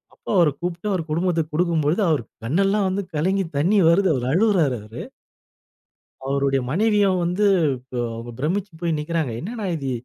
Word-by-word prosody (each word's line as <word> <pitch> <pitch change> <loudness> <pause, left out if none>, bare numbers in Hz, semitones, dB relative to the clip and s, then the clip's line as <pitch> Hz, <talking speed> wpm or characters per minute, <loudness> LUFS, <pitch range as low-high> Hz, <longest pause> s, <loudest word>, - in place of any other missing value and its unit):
அப்ப - - -47
அவர 170 -4 +5
கூப்பிட்டு 175 +3 -3
அவ - - +1
குடும்பத்துக்கு 165 -1 0
கொடுக்கும் 170 -2 +1
பொழுது 160 +8 +1
அவரு 150 -6 +1 0.2
கண்ணெல்லாம் 195 - +1
வந்து 195 +2 -2
கலங்கி 190 +5 +1
தண்ணி 180 +9 +2
வருது 185 +3 +3
அவ 125 - -3
அழுவுறாரு 180 - +3
அவரு. 110 +3 -9 1.3
அவருடைய 140 -1 +1
மனைவிய 210 +4 +3 0.2
வந்து 180 +5 +1 0.8
ப 120 - -8
பிரமிச்சு 185 +7 -1
போய் 170 -2 0
நிற்கிறாங்க. 155 -3 -2
என்ன 195 - -5
அண்ணா 220 -3 -4
இது 135 -4 -3
170 Hz, 155 wpm, -22 LUFS, 150-195 Hz, 1.3 s, அவர